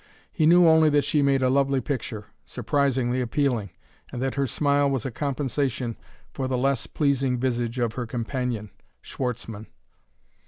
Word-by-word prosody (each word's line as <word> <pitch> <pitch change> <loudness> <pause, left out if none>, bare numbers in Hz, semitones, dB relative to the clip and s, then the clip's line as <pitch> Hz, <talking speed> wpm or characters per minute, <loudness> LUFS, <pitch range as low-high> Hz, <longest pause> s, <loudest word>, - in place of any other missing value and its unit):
He 155 - +2
knew 175 +1 +7
only 160 -1 +6
that 145 -1 +3
she 150 - +1
made 135 -1 +2
a 130 - +3
lovely 135 0 +2
picture, 120 -5 -4 0.2
surprisingly 130 0 0
appealing, 125 -4 0 0.4
and 120 - -5
that 130 +1 -1
her 140 -1 0
smile 145 +3 +2
was 135 -4 -2
a 130 - -2
compensation 130 -2 -2 0.4
for 135 -2 -3
the 130 -1 -1
less 135 +2 0
pleasing 135 -3 0
visage 120 -1 -1
of 120 -3 0
her 120 -1 -4
companion, 115 -2 -3 0.3
Schwartzmann. 115 -4 -5
130 Hz, 155 wpm, -25 LUFS, 120-140 Hz, 0.4 s, knew